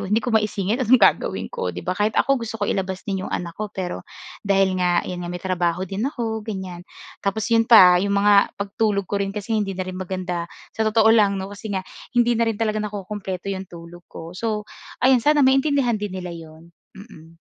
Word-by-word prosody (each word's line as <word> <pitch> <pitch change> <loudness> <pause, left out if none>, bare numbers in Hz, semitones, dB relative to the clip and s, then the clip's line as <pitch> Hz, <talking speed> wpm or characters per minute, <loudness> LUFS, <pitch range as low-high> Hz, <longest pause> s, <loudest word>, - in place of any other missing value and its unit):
hindi 210 +3 +1
ko 240 0 -3
maisingit, 215 +2 0
anong 255 +2 +5
gagawin 200 - +2
ko, - - -3
'di 90 - -8
ba? 180 - -1
Kahit 210 +3 0
ako 275 -3 +2
gusto 225 -1 -5
kong 205 - 0
ilabas 190 -1 -3
din 195 -2 -2
'yung - - -6
anak 170 -1 -4
ko, 215 0 -4
pero 185 -3 -5 0.4
dahil 195 -2 +2
nga 175 -1 +2
'yan 180 -1 -5
nga 175 - -5
may 180 - -5
trabaho 175 -1 -1
din 195 +3 -4
ako, 225 -5 -3
ganyan. 190 -5 -6 0.4
Tapos 200 +2 -1
'yun 230 -1 +4
pa, 180 -5 +8
'yung 200 - -1
mga 200 0 +5
pagtulog 200 0 -1
ko 200 +1 -1
rin 195 - -2
kasi 210 +2 -4
hindi 195 -3 -2
na 185 - -3
rin 185 - -6
maganda 185 -2 -4 0.2
sa 220 - -1
totoo 220 0 +3
lang 200 -3 +3
'no, 190 - -4
kasi 210 +2 -8
nga 190 -2 -3 0.2
hindi 240 0 +2
na 230 0 +1
rin 215 - -5
talaga 215 -1 0
nakukumpleto 200 -2 -5
yung 195 -1 -4
tulog 170 0 -11
ko. 165 +2 -9
So 215 +1 -3 0.3
ayun 255 -2 +4
sana 300 +3 +3
maintindihan 270 -2 +2
din 210 -1 -4
nila 180 -1 -6
'yun, 165 +1 -13 0.2
mm. 165 -6 -14
200 Hz, 215 wpm, -22 LUFS, 185-220 Hz, 0.4 s, pa